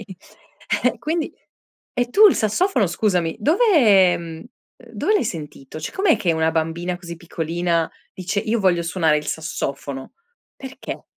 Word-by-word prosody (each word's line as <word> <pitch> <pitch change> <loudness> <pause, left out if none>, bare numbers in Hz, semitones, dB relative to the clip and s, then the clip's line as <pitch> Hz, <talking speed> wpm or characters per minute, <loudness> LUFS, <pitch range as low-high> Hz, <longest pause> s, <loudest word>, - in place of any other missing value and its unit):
okay. - - -9 0.8
Eh, 250 -1 +2
quindi 315 +6 -2 0.6
e 245 -1 0
tu 425 +8 +7
il 400 - +5
sassofono 230 - +1
scusami, 175 -2 0
dove 330 - +2 0.5
ehm, 165 -2 -5 0.4
ehm, 235 -2 -17
dove 230 - 0
l'hai 335 - +2
sentito? 150 -5 -7
Cioè 155 - -5
com'è 380 -4 +3
che 175 - +1
una 160 0 +1
bambina 165 +2 -2
così 170 -1 -8
piccolina 170 0 -2 0.2
dice: 190 +2 -2
"Io 225 +1 -1
voglio 180 -3 +2
suonare 165 -2 +1
il 150 - -8
sassofono"? 140 -3 -4 0.4
Perché? 265 -1 -8
175 Hz, 150 wpm, -21 LUFS, 160-235 Hz, 0.8 s, tu